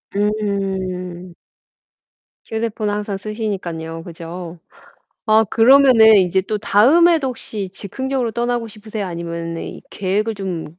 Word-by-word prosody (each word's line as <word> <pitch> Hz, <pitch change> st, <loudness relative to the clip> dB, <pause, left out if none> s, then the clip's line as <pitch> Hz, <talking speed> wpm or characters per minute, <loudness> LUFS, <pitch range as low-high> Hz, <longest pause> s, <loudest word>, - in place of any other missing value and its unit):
음. 190 Hz, -4 st, -2 dB, 1.1 s
휴대폰을 220 Hz, -2 st, -2 dB
항상 205 Hz, -1 st, -3 dB
쓰시니깐요, 180 Hz, -7 st, -5 dB
그죠? 170 Hz, 0 st, -8 dB, 0.7 s
아 220 Hz, +1 st, +5 dB
그러면은 235 Hz, -2 st, +6 dB
이제 190 Hz, 0 st, +2 dB
또 210 Hz, +2 st, -3 dB
다음에도 285 Hz, +9 st, +4 dB
혹시 215 Hz, -5 st, -5 dB
즉흥적으로 255 Hz, +5 st, -3 dB
떠나고 235 Hz, 0 st, -2 dB
싶으세요? 215 Hz, -1 st, -6 dB
아니면은 170 Hz, -1 st, -5 dB
이 -, -, -8 dB
계획을 205 Hz, +3 st, -1 dB
좀 175 Hz, -4 st, -6 dB
205 Hz, 275 characters per minute, -19 LUFS, 180-225 Hz, 1.1 s, 그러면은